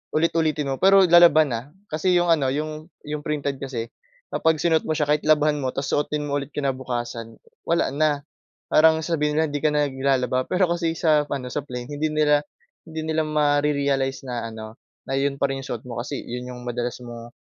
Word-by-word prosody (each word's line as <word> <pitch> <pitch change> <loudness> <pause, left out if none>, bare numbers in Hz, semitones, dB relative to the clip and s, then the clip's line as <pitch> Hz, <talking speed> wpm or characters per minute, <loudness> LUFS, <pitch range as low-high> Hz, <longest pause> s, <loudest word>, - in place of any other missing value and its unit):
ulit-ulitin 155 -3 +1
mo, - - -1
pero 195 0 +7
lalaban, 170 -4 +6
ah, 115 +1 -4 0.3
kasi 180 +4 +1
'yong 175 -1 +2
ano, 145 -5 +1
'yong 155 +3 -4 0.2
'yong 150 0 -4
printed 145 -2 -3
kasi, 125 -4 -4 0.5
kapag 160 0 +2
sinuot 160 +1 +2
mo 155 - 0
siya, 150 - +2
kahit 150 - 0
labhan 150 -1 +3
mo 130 - -1
tapos 135 0 -2
suotin 150 0 0
mo 145 0 -1
ulit 140 - -7
kinabukasan, 120 -4 -3 0.3
wala 170 -4 +2
na, 145 -1 +1 0.5
parang 160 +1 +5
sabihin 150 -3 0
nila, 160 - +3
'di 145 - -2
ka - - +3
naglalaba. 135 -3 0
Pero 185 +1 +2
kasi 165 -1 -1
sa 150 -2 +3
ano, 125 -3 -4
sa 150 - -1
plain, 125 -3 -7
hindi 150 +2 -1
nila 150 -1 +3 0.5
hindi 160 0 -5
nila 160 0 0
ma-rerealize 145 -3 +1
na 120 -3 -4
ano, 110 0 -9 0.2
na 135 - -5
'yon 140 0 0
pa 140 0 0
rin 135 - -3
'yong 135 - -8
suot 115 - -10
mo, 120 -2 -6
kasi 120 - -5
'yon 125 +1 -6
'yong 125 - -10
madalas 120 0 -4
mong 120 0 -10
145 Hz, 195 wpm, -23 LUFS, 130-155 Hz, 0.5 s, pero